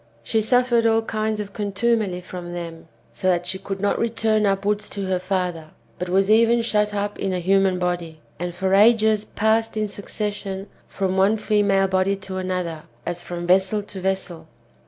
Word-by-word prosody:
She 220 - +1
suffered 240 0 +3
all 225 0 +3
kinds 215 -1 -2
of 205 -1 -5
contumely 205 -2 0
from 175 -1 -8
them, 165 -2 -7 0.2
so 185 - -3
that 175 -1 +2
she 190 +1 -3
could 195 0 -5
not 205 +1 0
return 220 -2 +1
upwards 205 +2 0
to 200 -1 -4
her 185 -1 0
father, 180 -4 -2 0.3
but 180 - -3
was 195 +3 +3
even 230 +1 +4
shut 210 -2 +1
up 205 0 -3
in 195 -1 -1
a 180 - -1
human 190 +1 +3
body, 175 -3 -2 0.2
and 175 0 -4
for 190 +1 0
ages 215 0 +5
passed 220 +1 0
in 215 0 0
succession 205 -1 -5 0.2
from 190 -1 -2
one 200 +3 +4
female 205 -2 +2
body 190 +1 +1
to 190 -1 -7
another, 180 -4 -3 0.2
as 175 0 -3
from 175 0 -5
vessel 190 +3 +3
to 200 -2 -9
vessel. 185 -4 -3
195 Hz, 180 wpm, -23 LUFS, 185-215 Hz, 0.3 s, ages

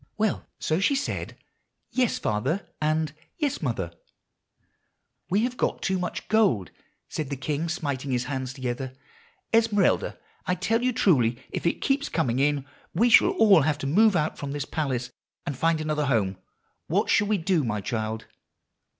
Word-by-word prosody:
Well, 215 -2 0
so 160 +2 0
she 275 +8 +3
said, 275 - -3 0.5
'Yes, 250 -3 +1
father,' 140 - -1
and 155 -1 +1 0.2
'Yes, 295 -5 -1
mother.' 110 - -2 1.4
"'We 195 +4 +2
have 250 0 -2 0.2
too 190 -1 0
much 180 -1 -4
gold,' 195 - +2 0.4
said 155 -4 -4
the 140 - -2
king, 145 +5 -2
smiting 140 -6 -3
his 125 -1 +1
hands 130 -1 -3
together. 130 0 -4 0.6
'Esmeralda, 220 -4 +3 0.3
I 180 - +2
tell 225 +6 +1
you 255 +1 +2
truly, 125 - +3
if - - -2
it - - 0
keeps 280 +2 +1
coming 130 -7 0
in 140 -1 +1 0.3
we 235 +7 +4
shall 360 - +7
all 215 - +6
have 150 +1 +1
to 145 - -5
move 205 +8 +4
out 155 -2 0
from 140 -1 -4
this 145 -2 -3
palace, 130 -6 -2 0.3
and 145 - -3
find 165 +4 +2
another 155 -2 -1
home. 100 -7 +1 0.5
What - - +1
shall 205 - +4
we 210 0 +2
do, 175 -2 +1
my 105 -4 -1
child? 110 -1 -3
155 Hz, 160 wpm, -26 LUFS, 130-200 Hz, 1.4 s, shall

